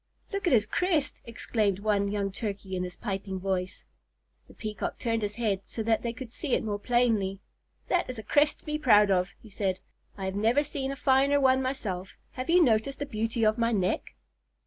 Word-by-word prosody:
"Look 395 -2 -1
at 325 - +4
his 220 -3 +5
crest!" 320 - 0
exclaimed 215 -4 0
one 200 -1 +1
young 200 -1 -1
Turkey 195 -2 -4
in 180 - -1
his 180 -1 -6
piping 195 -3 -4
voice. 185 -1 -3 0.6
The - - -17
Peacock 215 -1 -4
turned 230 -2 -1
his 205 0 -3
head 210 -5 0
so 225 - -5
that 225 0 +2
they 235 - -2
could 240 0 -9
see 285 -6 0
it - - -1
more 205 -2 -2
plainly. 220 -5 +1 0.5
"That 355 -6 +1
is 255 - -4
a 220 - -6
crest 290 +7 +2
to - - -29
be 300 0 -2
proud 210 -7 +5
of," 180 -1 +2
he 220 - -15
said. 190 -2 -1 0.4
"I 195 - -4
have 190 - -2
never 225 +8 +3
seen 275 -2 -3
a - - -4
finer 275 +2 +3
one 260 -1 +4
myself. 210 -9 -3 0.2
Have 255 +3 -6
you 350 +1 +6
noticed 245 +1 +2
the 285 - -3
beauty 225 -2 -2
of 215 +2 +2
my 230 0 +2
neck?" 185 - -1
225 Hz, 210 wpm, -28 LUFS, 200-260 Hz, 0.6 s, you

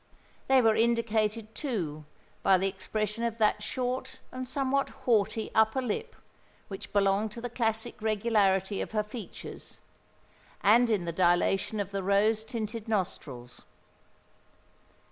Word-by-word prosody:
They 265 -1 +5
were 225 -1 +5
indicated, 225 -1 +1
too, 170 - -3 0.4
by 190 - +5
the 190 +2 +1
expression 210 +3 -3
of 230 -1 -1
that 210 -1 +2
short 255 +3 -3
and 255 0 -5
somewhat 275 +1 0 0.2
haughty 220 -2 +1
upper 220 +4 +3
lip 245 -5 -3 0.5
which 195 - -7
belonged 200 +1 +2
to 235 - -7
the 245 -1 -5
classic 225 -3 -2
regularity 205 -3 +2
of - - -5
her 215 -1 +1
features, 210 +1 -9 0.8
and 230 +4 +6
in 205 -6 +1
the 170 - -2
dilation 180 +4 +2
of 200 -1 -3
the 195 0 -2
rose 205 +3 +2
tinted 220 0 -5
nostrils. 155 - -3
215 Hz, 130 wpm, -29 LUFS, 195-235 Hz, 0.8 s, and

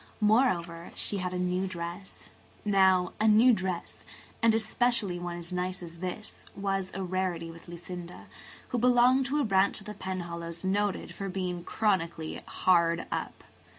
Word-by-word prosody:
Moreover, 190 -7 +2
she 205 - 0
had 180 -1 -2
a 180 - -3
new 180 +1 0
dress. 175 +1 -7 0.3
Now, 190 -3 +4
a 220 - +4
new 225 +4 +7
dress–and 190 +3 -2
especially 225 -4 +1
one 175 0 -4
as 175 +1 -8
nice 180 0 -2
as 170 0 -9
this–was 195 0 -4
a 195 - -2
rarity 180 -2 -2
with 165 0 -14
Lucinda, 175 0 -8 0.4
who 245 - 0
belonged 250 +2 +5
to 290 +2 0
a 285 - +2
branch 195 0 +3
of 200 - -9
the 210 - -6
Penhallows 170 -3 -5
noted 200 +1 0
for 195 -1 -5
being 180 -2 -3
chronically 170 -8 -1
hard 170 -2 +2
up. - - -4
185 Hz, 150 wpm, -29 LUFS, 175-210 Hz, 0.4 s, new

